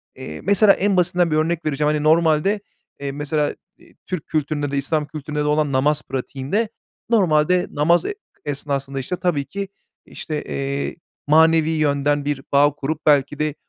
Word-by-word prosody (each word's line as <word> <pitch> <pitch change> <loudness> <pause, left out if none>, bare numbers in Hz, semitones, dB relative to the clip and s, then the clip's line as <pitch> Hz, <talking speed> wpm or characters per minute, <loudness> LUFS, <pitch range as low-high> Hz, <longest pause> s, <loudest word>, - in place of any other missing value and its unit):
eee, 80 - -8
mesela 200 +1 +5
en 200 -1 +1
basitinden 175 -1 +2
bir - - +2
örnek 165 +1 0
vereceğim, 150 0 +1
hani 150 - -1
normalde, 160 +5 +3 0.4
eee, 140 -1 -3
mesela, 150 +1 -1 0.4
ııı, - - -20 0.2
Türk 180 -4 -4
kültüründe 145 -2 -1
de,e 140 - -1
İslam 150 +2 -1
kültüründe 150 -1 -5
de 150 - +1
olan 150 -1 +1
namaz 145 +3 +1
pratiğinde 135 - -2 0.4
normalde 180 -4 +3
namaz, 170 +4 +2
e 415 - -3 0.3
esnasında 140 -1 -3
işte 135 +8 -3
tabii 170 -6 -1
ki 200 0 -5 0.4
işte, 150 -2 -5
eee, 140 0 -3 0.3
manevi 160 +1 +5
yönden 145 -2 +1
bir 145 -2 -2
bağ 145 +1 +5
kurup 150 +2 -4
belki 145 -1 +3
de 155 -1 -1
150 Hz, 160 wpm, -21 LUFS, 140-165 Hz, 0.4 s, mesela